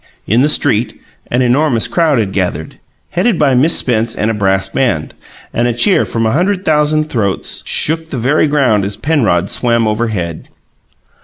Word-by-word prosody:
In 115 Hz, +5 st, +1 dB
the 145 Hz, -, +3 dB
street 115 Hz, -5 st, +1 dB, 0.3 s
an 125 Hz, +2 st, 0 dB
enormous 125 Hz, -2 st, +2 dB
crowd 150 Hz, +3 st, +1 dB
had 100 Hz, -4 st, -2 dB
gathered, 90 Hz, -5 st, -3 dB, 0.3 s
headed 185 Hz, +2 st, 0 dB
by 140 Hz, -3 st, +2 dB
Miss 140 Hz, +7 st, +3 dB
Spence 115 Hz, -2 st, 0 dB
and 110 Hz, -, -1 dB
a -, -, -2 dB
brass 95 Hz, -2 st, 0 dB
band; 95 Hz, -, -2 dB, 0.4 s
and 120 Hz, +1 st, 0 dB
a 120 Hz, -, 0 dB
cheer 185 Hz, -, +2 dB
from 115 Hz, -1 st, -2 dB
a 110 Hz, -, +1 dB
hundred 185 Hz, -, -1 dB
thousand 155 Hz, 0 st, +2 dB
throats 100 Hz, -6 st, -1 dB
shook 160 Hz, +1 st, +2 dB
the 135 Hz, -, -5 dB
very 140 Hz, +6 st, +1 dB
ground 130 Hz, -9 st, +1 dB
as 100 Hz, +1 st, -4 dB
Penrod 110 Hz, -, 0 dB
swam 115 Hz, -2 st, +1 dB
overhead. 105 Hz, -7 st, -3 dB
120 Hz, 170 wpm, -13 LUFS, 105-150 Hz, 0.4 s, the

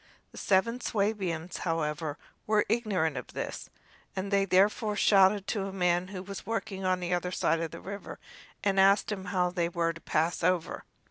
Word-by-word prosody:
The -, -, -10 dB
seven 230 Hz, +6 st, +2 dB
Swabians, 195 Hz, -7 st, -1 dB
however, 155 Hz, -2 st, -2 dB, 0.3 s
were 215 Hz, -1 st, +3 dB
ignorant 200 Hz, -, 0 dB
of 125 Hz, -, -7 dB
this, -, -, -5 dB, 0.5 s
and 195 Hz, +1 st, -3 dB
they 200 Hz, -1 st, +3 dB
therefore 205 Hz, +3 st, +2 dB
shouted 195 Hz, -1 st, +4 dB
to 200 Hz, -4 st, -1 dB
a -, -, -5 dB
man 180 Hz, -1 st, +1 dB
who 185 Hz, -1 st, -7 dB
was 195 Hz, 0 st, -7 dB
working 220 Hz, -4 st, -3 dB
on 185 Hz, -1 st, +1 dB
the 180 Hz, 0 st, -1 dB
other 180 Hz, 0 st, -1 dB
side 165 Hz, -2 st, +1 dB
of 165 Hz, -, -2 dB
the 165 Hz, -, -10 dB
river 200 Hz, +1 st, -7 dB, 0.5 s
and 195 Hz, -1 st, +2 dB
asked 195 Hz, +2 st, +4 dB
him 190 Hz, -2 st, -4 dB
how 180 Hz, -1 st, 0 dB
they 170 Hz, -2 st, 0 dB
were 170 Hz, -1 st, 0 dB
to 165 Hz, -, -12 dB
pass 165 Hz, +2 st, 0 dB
over. 180 Hz, -1 st, 0 dB
190 Hz, 185 wpm, -29 LUFS, 175-200 Hz, 0.5 s, shouted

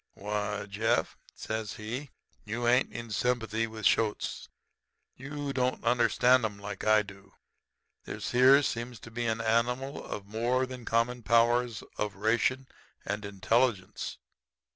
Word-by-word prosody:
"'Why, 105 Hz, 0 st, -3 dB
Jeff,' 105 Hz, +3 st, 0 dB, 0.2 s
says 110 Hz, -1 st, -4 dB
he, 120 Hz, +7 st, -5 dB, 0.3 s
'you 120 Hz, +2 st, -2 dB
ain't 125 Hz, +1 st, +3 dB
in 115 Hz, 0 st, -7 dB
sympathy 115 Hz, -1 st, 0 dB
with 110 Hz, -1 st, -7 dB
shoats. 110 Hz, -2 st, +1 dB, 0.7 s
You 140 Hz, +1 st, -5 dB
don't 130 Hz, -1 st, 0 dB
understand 125 Hz, +1 st, +4 dB
'em 105 Hz, -2 st, -2 dB
like 100 Hz, -1 st, -7 dB
I 110 Hz, 0 st, +5 dB
do. 100 Hz, -1 st, -14 dB, 0.7 s
This -, -, -5 dB
here 130 Hz, +3 st, +6 dB
seems 120 Hz, -2 st, -3 dB
to 115 Hz, -, -11 dB
me -, -, -20 dB
to -, -, -20 dB
be 120 Hz, 0 st, -1 dB
an 110 Hz, 0 st, 0 dB
animal 125 Hz, +4 st, 0 dB
of 100 Hz, -, -6 dB
more 120 Hz, +5 st, 0 dB
than 130 Hz, -2 st, -9 dB
common 120 Hz, +2 st, +1 dB
powers 120 Hz, 0 st, +2 dB, 0.2 s
of 105 Hz, -1 st, -2 dB
ration 120 Hz, +5 st, +1 dB, 0.4 s
and 105 Hz, +1 st, -3 dB
intelligence. 100 Hz, +1 st, 0 dB
115 Hz, 140 wpm, -29 LUFS, 105-125 Hz, 0.7 s, here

